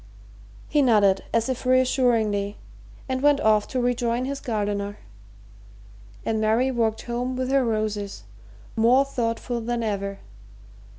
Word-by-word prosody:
He 295 - +2
nodded 205 -7 +3
as 230 0 +1
if 260 -2 -3
reassuringly 240 -6 +2 0.5
and 260 -1 -2
went 290 0 +4
off 215 -4 +3
to 255 - -2
rejoin 245 0 0
his 275 +1 -4
gardener, 205 -2 -2 1.3
and 220 -1 0
Mary 225 +5 +2
walked 225 -3 0
home 245 +2 -3
with 255 +1 -2
her 275 -1 +3
roses, 215 - -2 0.5
more 245 +5 +4
thoughtful 240 -2 -2
than 235 +1 -2
ever. 200 -2 -3
235 Hz, 125 wpm, -24 LUFS, 215-255 Hz, 1.3 s, went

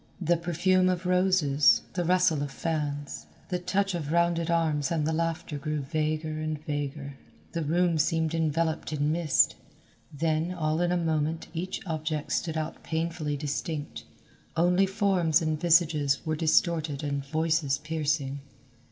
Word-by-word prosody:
The 175 -1 +2
perfume 180 +2 +2
of 180 0 -2
roses, 180 -6 +4
the 180 - -1
rustle 180 -3 +3
of 145 - -2
fans, 145 -1 -3 0.2
the 180 - -1
touch 190 +2 0
of 155 -4 -3
rounded 170 0 +2
arms 160 -4 +1
and 160 -3 0
the 160 - 0
laughter 165 -2 -2
grew 150 +1 -2
vaguer 155 +1 -2
and 155 -1 -3
vaguer. 145 -1 -4 0.3
The 170 - -2
room 170 +1 +1
seemed 160 0 +1
enveloped 160 0 0
in 150 0 0
mist. 160 -3 +3 0.6
Then, 160 +4 -1
all 155 -1 0
in 175 0 +1
a 180 - +2
moment 160 -1 -1
each 180 +4 -4
object 155 -3 -3
stood 160 -2 -1
out 155 0 -4
painfully 160 -2 -2
distinct, 150 +1 -4 0.5
only 180 +3 +4
forms 190 -5 +2
and 155 -2 -2
visages 160 -5 +3
were 155 -1 0
distorted 160 -2 +1
and 140 -1 -2
voices 155 -1 0
piercing. 150 -2 -2
160 Hz, 145 wpm, -28 LUFS, 150-170 Hz, 0.6 s, roses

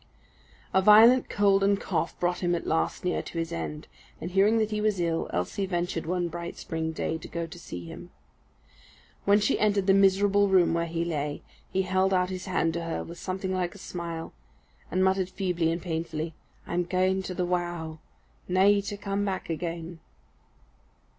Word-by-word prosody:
A 190 - +5
violent 225 +5 +7
cold 200 -1 +3
and 200 0 +3
cough 170 -2 -2
brought 175 0 0
him 175 -1 +1
at 170 - -4
last 80 - -1
near 180 - 0
to - - -8
his 165 0 -2
end, 155 -2 -5 0.3
and 175 - -5
hearing 200 +4 +4
that 220 -1 +1
he 210 0 -1
was 210 -3 +1
ill, 165 -1 0
Elsie 90 - -2
ventured 175 -3 -2
one 175 0 0
bright 170 0 -6
spring 160 0 -3
day 160 0 -2
to - - -9
go 170 0 -3
to 175 +2 -11
see 90 - -8
him. 80 - -9 1.2
When 200 +1 +5
she 210 +6 +1
entered 205 -2 +2
the 195 - +5
miserable 195 +1 +4
room 185 -3 +4
where 170 0 0
he 165 0 -2
lay, 150 -3 -3 0.3
he 190 - +1
held 190 +1 +2
out 180 0 +1
his 185 -1 -5
hand 165 -3 +1
to 170 0 -3
her 165 - -3
with 170 +1 -10
something 190 0 -3
like 180 0 -2
a - - -10
smile, 170 -3 -6 0.6
and 185 +2 +1
muttered 190 -1 +2
feebly 180 -4 0
and 165 - -2
painfully, 160 -2 -3 0.3
"I'm 175 +1 -1
gaein' 185 +2 +1
to 185 - -5
the 180 0 0
wow, 175 -3 -2 0.5
nae 195 +3 +4
to 200 +1 -5
come 200 0 -2
back 190 -3 -3
again." 165 0 -4
180 Hz, 185 wpm, -27 LUFS, 165-195 Hz, 1.2 s, violent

